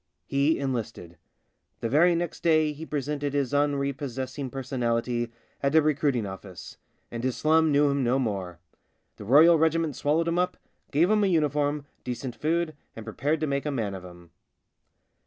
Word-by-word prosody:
He 140 +3 +2
enlisted. 115 -10 -4 0.6
The - - -2
very 165 +8 +4
next 170 -1 -3
day 155 -2 +3
he 160 +2 -9
presented 145 0 -3
his 140 -1 0
unprepossessing 140 -2 -1
personality 120 -2 -2 0.3
at 140 +2 +1
a 160 - +7
recruit 145 -2 +1
ing 115 -4 -1
office 95 -1 -9 0.2
— - - -44
and 115 0 -5
his 130 -1 -1
slum 160 0 +3
knew 145 +1 +4
him 140 -1 +1
no 125 +2 +2
more. 100 -9 -3 0.6
The 105 - -9
Royal 155 +8 +6
Regiment 160 -2 +1
swallowed 160 +3 +1
him 170 +1 +1
up, 180 0 0 0.3
gave 165 +7 +3
him 215 -1 +3
a - - +3
uniform, 150 -3 +1 0.2
decent 125 0 -5
food, 155 +4 -1 0.2
and 115 - -8
prepared 145 +8 -1
to - - +1
make 140 0 -2
a - - +1
man 115 -8 -2
of 95 -1 -7
him. 85 -2 -13
140 Hz, 175 wpm, -26 LUFS, 120-155 Hz, 0.6 s, a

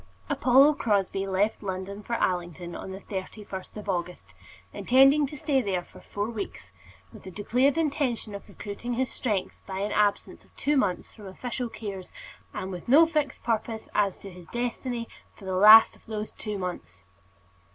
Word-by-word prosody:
D. - - -28 0.3
Apollo 270 +4 +6
Crosbie 195 -5 0
left 200 +3 0
London 195 +1 -5
for 235 - -6
Allington 175 -3 -2
on - - -7
the 190 +1 -8
31st 190 0 -7
of 210 - -8
August, 180 -2 -4 0.4
intending 270 +3 +5
to 295 - -9
stay 270 -1 +1
there 190 -5 -1
four 205 +3 -6
weeks, 200 - -6 0.4
with - - -12
the 190 - -9
declared 250 - +1
intention 275 -8 -1
of 200 - -9
recruiting 235 +4 -5
his 260 +1 -1
strength 210 -7 -1
by 190 -1 -5
an 205 +1 -1
absence 205 -1 0
of - - -28
two 295 +1 +1
months 200 -10 0
from 210 -3 -11
official 245 +5 -4
cares, 200 -5 -7 0.4
and 190 - -5
with 180 -2 -7
no 295 +7 +7
fixed 300 -4 -2
purpose 225 -1 -2
as 200 -2 +1
to 195 - -10
his 180 -2 -13
destiny 240 +1 -3 0.3
for 200 - -13
the 190 - -3
last 215 +4 +9
of - - -23
those 215 -1 -4
two 210 -2 -5
months. 95 - -6
210 Hz, 170 wpm, -27 LUFS, 190-245 Hz, 0.4 s, last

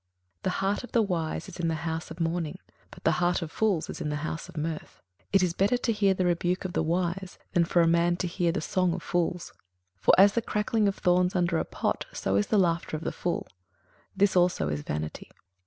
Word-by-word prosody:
21:007:004 - - -56
The - - +1
heart 195 +4 -1
of 245 - -10
the 235 - +4
wise 170 -4 -2
is 190 -1 -10
in 170 - 0
the 165 - 0
house 160 0 -4
of 165 +1 -9
mourning; 165 -1 -1 0.3
but - - -14
the - - +4
heart 175 0 +2
of 160 - -7
fools 200 -6 +1
is - - -7
in 150 - -2
the 150 - -1
house 160 - -5
of - - -12
mirth. 155 +1 -4 0.3
21:007:005 - - -43
It 195 -2 +5
is 175 -2 +1
better 200 +7 +2
to 245 -1 0
hear 200 -2 +3
the 185 - 0
rebuke 175 +2 0
of 180 - -3
the - - +1
wise, 175 +3 -1 0.2
than 170 -1 +4
for 170 0 +3
a - - +3
man 170 +1 +3
to 185 - -2
hear 175 -1 0
the 190 - -2
song 180 -2 +1
of 180 - -7
fools. 175 0 -1 0.5
21:007:006 - - -35
For - - +7
as 200 +2 +7
the 235 - +1
crackling 210 0 0
of 195 - 0
thorns 180 +1 +2
under 175 -2 +2
a - - -1
pot, - - -2
so 95 - -1
is 100 +1 +2
the 215 - +2
laughter 170 -4 +1
of 155 - -9
the - - -1
fool: 175 - -2 0.7
this 200 -1 +3
also 175 - +3
is 75 0 -2
vanity. 75 +1 -5
175 Hz, 250 wpm, -28 LUFS, 165-190 Hz, 0.7 s, For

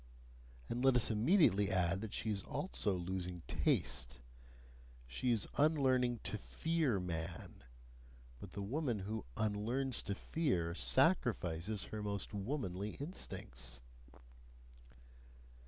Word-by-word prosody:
And 120 +2 -2
let 135 -1 +6
us 120 -2 +4
immediately 110 - +4
add 90 -1 +2
that 110 -2 -5
she 110 - -1
is 100 -2 -1
also 145 - -1
losing 90 0 -3
taste. - - +1 0.9
She 65 - -1
is 115 -4 +1
unlearning 130 -6 +3
to 105 +1 -2
FEAR 160 -10 0
man: 85 -4 -5 0.8
but 90 +4 -10
the 100 - -4
woman 125 +2 -1
who 110 +3 -4
"unlearns 115 +5 0
to 100 - -1
fear" 95 - 0
sacrifices 105 - +2
her 110 - -5
most 100 -1 -3
womanly 105 -3 -3
instincts. 65 - -3
105 Hz, 110 wpm, -37 LUFS, 90-130 Hz, 0.9 s, let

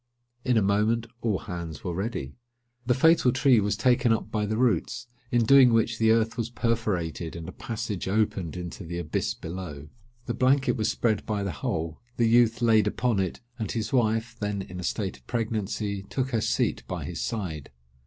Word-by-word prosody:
In 125 -2 +2
a 110 - +4
moment 105 +4 +2 0.2
all 110 -5 +1
hands 85 -4 -6
were 90 - -2
ready. 95 - -3 0.5
The 125 - +3
fatal 160 -3 +5
tree 130 -2 +4
was 105 0 0
taken 125 +1 +3
up 115 - 0
by 105 -1 0
the 110 +1 -1
roots; 120 -3 +1 0.2
in 120 -1 +3
doing 130 +1 +7
which, 115 0 +2
the 110 -1 +4
earth 115 +1 +2
was 115 -1 -2
perforated, 105 -9 -1
and 85 -1 -7
a - - -5
passage 110 -4 -4
opened 95 -4 0
into 90 +2 -6
the 85 +1 -5
abyss 85 -4 -2
below. 80 -4 -7 0.4
The 120 - -2
blanket 130 +1 +3
was 110 - 0
spread 110 -3 0
by 105 -2 -1
the 100 - -2
hole, 80 +2 -3 0.2
the 115 - +3
youth 120 0 +4
laid 110 -2 +4
upon 115 0 +1
it, 95 -3 -2 0.2
and 110 -4 -2
his 110 +1 -3
wife, 115 -1 +1
then 105 -2 -2
in 90 -1 -8
a - - -5
state 65 - -2
of 65 - -27
pregnancy, 105 -3 -2
took 130 0 -2
her 115 -3 +1
seat - - 0
by - - -4
his - - -5
side. 85 -10 -4
110 Hz, 195 wpm, -27 LUFS, 95-115 Hz, 0.5 s, doing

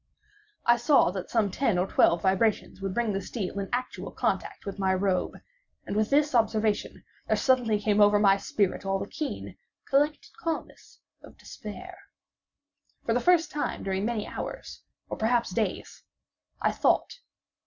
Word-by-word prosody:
I 240 0 +5
saw 240 - +4
that 185 -1 -6
some 215 -4 +1
ten 225 -2 +1
or 180 - +2
twelve 170 -3 +3
vibrations 195 +1 +1
would 195 -1 -2
bring 235 -3 0
the 195 - -2
steel 200 -1 -4
in 195 -1 -4
actual 250 +1 -3
contact - - -2
with 200 0 -6
my 190 -1 +2
robe, 185 -1 0 0.5
and - - -4
with 215 0 +1
this 295 +1 +3
observation 220 -2 0 0.2
there - - +2
suddenly 245 -5 +2
came 210 0 +2
over 205 0 +6
my 200 -1 +5
spirit 200 -1 -1
all 195 0 0
the 195 - -4
keen, 300 +7 -6 0.3
collected 295 +2 +1
calmness 330 -7 -5 0.2
of - - -15
despair. - - -9 1.1
For 230 - +1
the 245 - +2
first 350 +2 +3
time 295 - -3
during 190 0 -1
many 225 -1 -1
hours—or - - -8
perhaps 235 -1 +1
days—I 200 0 -4
thought. - - +1
215 Hz, 155 wpm, -27 LUFS, 195-245 Hz, 1.1 s, over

